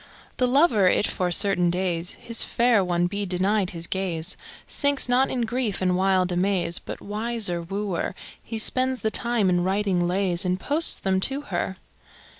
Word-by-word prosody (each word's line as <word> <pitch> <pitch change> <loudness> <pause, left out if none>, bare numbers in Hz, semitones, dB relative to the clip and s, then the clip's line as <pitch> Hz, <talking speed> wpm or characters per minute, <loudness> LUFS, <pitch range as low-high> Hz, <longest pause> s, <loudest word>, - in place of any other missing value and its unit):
The 250 - +2
lover, 250 - +3
if 205 - +2
for 180 -1 -1
certain 180 0 +2
days 175 -1 -1
His 230 -1 -1
fair 235 -4 +2
one 175 -1 0
be 200 +3 -3
denied 190 +1 0
his 170 -1 -3
gaze, 175 -4 -2 0.3
Sinks 285 -2 +1
not 250 +2 +2
in 250 - -2
grief 230 -2 -1
and 185 -1 +1
wild 185 -1 +1
amaze, 180 -1 0
But, - - -9
wiser 210 -4 -1
wooer, 195 +1 -4 0.3
He 225 - -6
spends 255 +3 +2
the 220 - -1
time 235 -4 +1
in 175 -1 +1
writing 190 -2 0
lays, 185 0 0
And 180 0 -1
posts 300 +9 +3
them 190 -1 0
to 270 +8 +1
her. - - -4
195 Hz, 170 wpm, -24 LUFS, 180-230 Hz, 0.3 s, lover